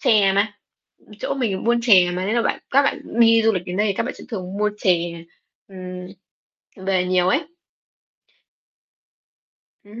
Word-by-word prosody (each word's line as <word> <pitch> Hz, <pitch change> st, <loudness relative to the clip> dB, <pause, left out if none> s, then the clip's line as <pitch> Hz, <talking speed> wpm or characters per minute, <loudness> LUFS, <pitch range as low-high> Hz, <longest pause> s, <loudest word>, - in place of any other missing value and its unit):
chè 200 Hz, -3 st, +4 dB
mà, 205 Hz, +2 st, 0 dB, 0.4 s
ừ, -, -, -30 dB
chỗ 275 Hz, -, -2 dB
mình 230 Hz, -8 st, -2 dB
buôn 235 Hz, +1 st, +2 dB
chè 185 Hz, -7 st, +5 dB
mà, 180 Hz, +1 st, -3 dB
nên 215 Hz, +4 st, -1 dB
là 235 Hz, -, +2 dB
bạn -, -, -1 dB
các 275 Hz, +2 st, +4 dB
bạn 280 Hz, -, -1 dB, 0.2 s
đi 230 Hz, -1 st, +6 dB
du 225 Hz, -, +4 dB
lịch 180 Hz, -1 st, -3 dB
đến 180 Hz, +1 st, -5 dB
đây 210 Hz, -, +2 dB
thì 200 Hz, -, 0 dB
các 195 Hz, -, -2 dB
bạn 250 Hz, -, -5 dB
sẽ -, -, -12 dB
thường 190 Hz, -4 st, -6 dB
mua 210 Hz, 0 st, +1 dB
chè, 170 Hz, -3 st, 0 dB, 0.4 s
ừm, 185 Hz, -1 st, -8 dB, 0.8 s
về 185 Hz, -2 st, +1 dB
nhiều 180 Hz, 0 st, +2 dB
ấy. 280 Hz, -, +2 dB, 2.4 s
Ừm 215 Hz, +3 st, -12 dB
195 Hz, 180 wpm, -21 LUFS, 180-225 Hz, 2.4 s, đi